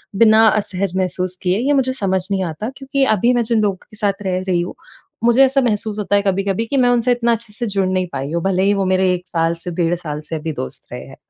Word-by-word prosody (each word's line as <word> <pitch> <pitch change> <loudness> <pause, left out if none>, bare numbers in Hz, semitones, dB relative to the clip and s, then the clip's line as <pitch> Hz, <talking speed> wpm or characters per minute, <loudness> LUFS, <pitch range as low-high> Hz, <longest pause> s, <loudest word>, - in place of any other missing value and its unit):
बिना 220 +1 +6
असहज 200 -3 -1
महसूस 185 0 -1
किए। 185 +3 +1
ये 280 +4 +1
मुझे 260 -1 +1
समझ 190 -6 -1
नहीं 190 -1 0
आता 170 +7 -4
क्योंकि 270 0 -1
अभी 240 +6 +3
मैं 240 -1 +2
जिन 220 -2 +3
लोगों 200 -2 +1
के 215 +2 -16
साथ 205 -2 -1
रह 185 -1 -1
रही 175 -2 +1
हूँ, 175 - -5 0.5
मुझे 240 +3 +5
ऐसा 270 +1 +3
महसूस 215 -2 -1
होता 205 0 0
है 200 - +4
कभी-कभी 195 +2 0
कि 275 - -1
मैं 245 -1 +4
उनसे 245 0 +2
इतना 235 -1 +1
अच्छे 225 -2 -6
से 240 +2 -4
जुड़ 195 -2 0
नहीं 185 -1 0
पाई 135 +3 -4
हूँ। 170 - -1
भले 190 -1 +1
ही 200 +1 +3
वो 195 -1 0
मेरे 185 0 +2
1 180 0 -5
साल 165 -1 0
से 175 - -3
डेढ़ 170 +1 +2
साल 150 -4 -5
से 160 -1 -3
भी 160 0 -4
दोस्त 65 - -6
रहे - - -6
हैं। - - -12
195 Hz, 260 wpm, -19 LUFS, 180-230 Hz, 0.5 s, बिना